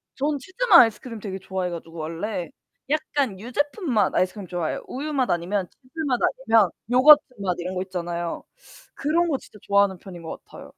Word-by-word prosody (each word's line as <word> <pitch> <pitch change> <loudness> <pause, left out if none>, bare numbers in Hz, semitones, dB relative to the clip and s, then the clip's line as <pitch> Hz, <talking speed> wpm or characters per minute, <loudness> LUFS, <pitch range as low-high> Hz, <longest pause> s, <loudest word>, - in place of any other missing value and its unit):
저는 290 +1 0
치즈맛 375 - +5
아이스크림 225 0 -1
되게 195 -2 -6
좋아해 190 -1 -3
가지고 165 -1 -8
원래 170 +2 -4 0.4
약간 290 -8 -1
유제품 290 - -2
맛 210 - +2
아이스크림 185 +1 0
좋아해요. 175 -2 -3
우유맛 275 -1 -2
아니면 180 +2 -1
치즈맛 265 -1 -2
아니면 225 -7 +3 0.2
요거트맛 250 - +5
이런 180 +2 -4
거 185 - -1
있잖아요. 175 -2 -4 0.5
그런 335 +5 +1
거 280 - +1
진짜 210 - -16
좋아하는 200 -1 +3
편인 175 -3 -10
것 160 - -8
같아요. - - -12
210 Hz, 405 characters per minute, -24 LUFS, 180-280 Hz, 0.5 s, 치즈맛